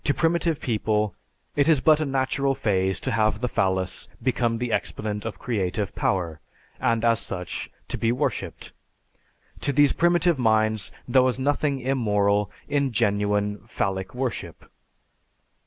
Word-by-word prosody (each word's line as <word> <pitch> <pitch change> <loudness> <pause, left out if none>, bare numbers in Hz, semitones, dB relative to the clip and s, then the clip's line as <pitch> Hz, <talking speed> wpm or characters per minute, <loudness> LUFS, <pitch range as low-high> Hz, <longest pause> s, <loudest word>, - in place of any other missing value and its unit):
To 145 - +2
primitive 165 -1 +1
people 105 -3 0 0.4
it 145 +2 +3
is 155 -4 +5
but 155 +3 +5
a 155 - 0
natural 135 0 0
phase 95 -4 +1
to 130 - -2
have 110 -2 +1
the 125 - -1
phallus 95 -4 0
become 120 -3 0
the 120 0 -3
exponent 105 -1 -2
of 115 - -4
creative 105 -4 -2
power, 85 -5 -1 0.4
and 115 0 +1
as 115 -1 +4
such 90 -2 -5 0.2
to - - -2
be 115 - +2
worshiped. 125 - -3 0.9
To - - 0
these 145 0 +4
primitive 175 -2 +3
minds 110 -3 +2 0.2
there 130 +1 +5
was 130 -1 +1
nothing 145 +1 0
immoral 105 -6 +1 0.2
in 140 -2 +1
genuine 105 -1 +1
phallic 95 +4 -2
worship. 125 -1 -4
115 Hz, 140 wpm, -25 LUFS, 105-135 Hz, 0.9 s, is